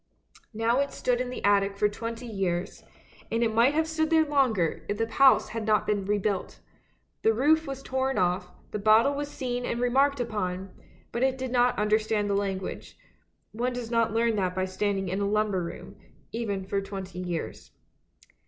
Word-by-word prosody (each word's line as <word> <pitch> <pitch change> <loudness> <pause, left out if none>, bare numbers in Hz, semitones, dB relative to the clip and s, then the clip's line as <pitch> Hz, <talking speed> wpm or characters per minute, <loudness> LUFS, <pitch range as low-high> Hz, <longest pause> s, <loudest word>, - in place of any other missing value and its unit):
Now 230 +3 +1
it 280 0 0
stood 250 -1 0
in 250 - -3
the 250 - -6
attic 200 -1 +3
for 210 - +3
twenty 230 +3 -6
years, 190 -5 -3 0.5
and 230 +1 +1
it 225 -1 +1
might 240 +6 +4
have 320 0 +2
stood 315 -1 0
there 320 -1 +4
longer, 255 - +1
if 205 - -1
the 225 - +1
house 265 +4 +5
had 225 0 -4
not 210 -1 +3
been 205 -2 0
rebuilt. 205 -1 -1 0.6
The 225 0 +3
roof 315 +6 +3
was 270 0 -6
torn 265 0 -1
off, 180 0 +1 0.2
the 210 - -3
bottle 220 +6 +5
was 290 +1 -3
seen 245 -3 -3
and 235 - -2
remarked 270 +3 +2
upon, 190 -5 -3 0.4
but 235 - -3
it 265 0 +2
did 260 -1 -4
not 245 0 +3
understand 210 0 +1
the - - +2
language; 195 -2 -3 0.5
one 245 +3 -2
does 245 -2 -5
not 230 -1 +2
learn 230 0 +1
that 185 -2 -1
by 185 0 0
stand 195 +2 -1
ing 195 0 -3
in 190 +3 -2
a 200 - 0
lumber 210 -3 +1
room, 170 - -8 0.4
even 205 -5 -3
for 195 +1 -1
twenty 190 -2 -7
years. 175 -3 -5
220 Hz, 190 wpm, -27 LUFS, 200-250 Hz, 0.6 s, house